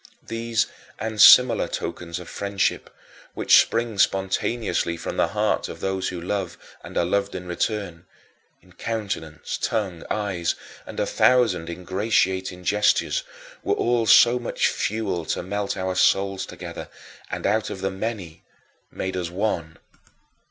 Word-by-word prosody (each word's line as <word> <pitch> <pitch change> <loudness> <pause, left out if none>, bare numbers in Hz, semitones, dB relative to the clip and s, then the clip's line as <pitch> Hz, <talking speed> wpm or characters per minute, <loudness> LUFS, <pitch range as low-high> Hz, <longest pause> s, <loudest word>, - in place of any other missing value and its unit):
These 115 -1 0 0.3
and 110 -1 -2
similar 125 -3 +8
tokens 85 -1 -5
of 90 -1 -9
friendship, 100 -1 -1 0.5
which - - +6
spring 115 -3 -2
spontaneously 95 -2 0
from - - -5
the - - +3
hearts - - 0
of - - -8
those 95 -1 -1
who 90 - -5
love 95 0 -3 0.3
and - - -7
are 85 - +3
loved 100 +2 0
in 90 -1 -6
return 90 -1 -3 0.6
in 90 -1 -21
countenance, 95 -7 -4
tongue, 95 -7 -2
eyes, 95 -6 -1 0.3
and - - -7
a - - +2
thousand 110 -10 +3
ingratiating 95 0 -1
gestures 105 +3 +2 0.4
were - - 0
all 120 -1 +1
so 120 +3 +7
much 120 - 0
fuel 100 -5 -2
to - - -2
melt 100 +2 -3
our 95 0 -1
souls 95 +1 +2
together, - - -8 0.4
and - - -4
out 110 +1 +1
of 95 - -6
the 95 0 -1
many 95 -5 -5 0.5
made 95 0 -4
us 90 -2 -2
one. 85 -4 -2
95 Hz, 140 wpm, -24 LUFS, 90-110 Hz, 0.6 s, similar